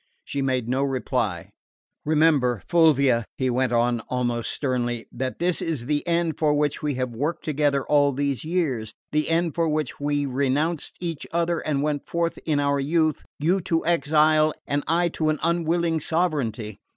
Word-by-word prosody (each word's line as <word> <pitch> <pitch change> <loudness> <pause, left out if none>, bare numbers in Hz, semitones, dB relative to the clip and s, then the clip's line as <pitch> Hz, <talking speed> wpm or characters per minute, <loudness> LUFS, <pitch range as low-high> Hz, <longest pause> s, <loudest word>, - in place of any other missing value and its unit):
She 140 - -3
made 130 -3 0
no 130 +2 0
reply. 125 -9 -1 0.5
"Remember, 150 - +3
Fulvia," 140 -8 +4
he 130 -1 0
went 125 0 +1
on 120 0 +2
almost 120 -2 -1
sternly, 120 -4 -2
"that 130 +1 -4
this 175 0 0
is 150 -8 -2
the 145 +4 -1
end 170 -1 0
for 150 -2 +3
which 145 -1 0
we 150 -2 -1
have 125 -1 -2
worked 145 +8 -3
together 145 -3 +1
all 145 -1 +3
these 140 -1 -2
years 145 -11 -2 0.2
the 150 0 0
end 165 -1 +1
for 165 -1 +1
which 155 0 -2
we 145 0 0
renounced 140 +4 -1
each 165 -4 -4
other 170 0 0
and 145 -2 -1
went 150 -2 -2
forth 170 0 -1
in 150 -2 +2
our 140 0 +1
youth, 155 +2 +1
you 175 +6 +1
to 165 -2 -1
exile 155 -1 +3
and 145 0 -1
I 170 +2 +2
to 155 -1 -1
an 155 - +1
unwilling 170 0 +1
sovereignty. 135 - -1
145 Hz, 170 wpm, -24 LUFS, 130-165 Hz, 0.5 s, Fulvia